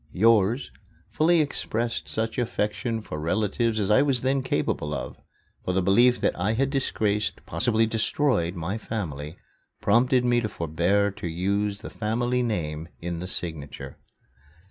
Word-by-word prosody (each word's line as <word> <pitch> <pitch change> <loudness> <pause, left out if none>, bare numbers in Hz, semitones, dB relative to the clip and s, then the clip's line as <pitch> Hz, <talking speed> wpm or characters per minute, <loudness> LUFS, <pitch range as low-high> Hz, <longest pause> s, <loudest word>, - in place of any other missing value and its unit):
"Yours" 115 +4 +3 0.4
fully 165 +1 +4
expressed 120 -5 -2
such 110 +2 -2
affection 115 0 -1
for 75 - -6
relatives 110 +7 0
as 100 0 +1
I 105 - +6
was 135 -4 +2
then 135 +1 +2
capable 75 -11 -1
of 65 -1 -6 0.5
for 90 - -1
the 95 - +2
belief 120 +7 +5
that - - +1
I 100 +5 +1
had 135 +4 +1
disgraced, 105 -7 -1
perhaps 125 - -2 0.2
destroyed, 110 - +1
my 90 +6 -3
family 80 -8 -5 0.4
prompted 125 +4 +3
me 120 -1 +3
to 110 - -2
forbear 90 +5 +1
to 95 - -6
use 100 +4 -1
the - - -8
family 120 +3 0
name 80 -9 -2
in 85 -1 -4
the 90 - -5
signature. 80 -6 -4
105 Hz, 145 wpm, -26 LUFS, 90-120 Hz, 0.5 s, I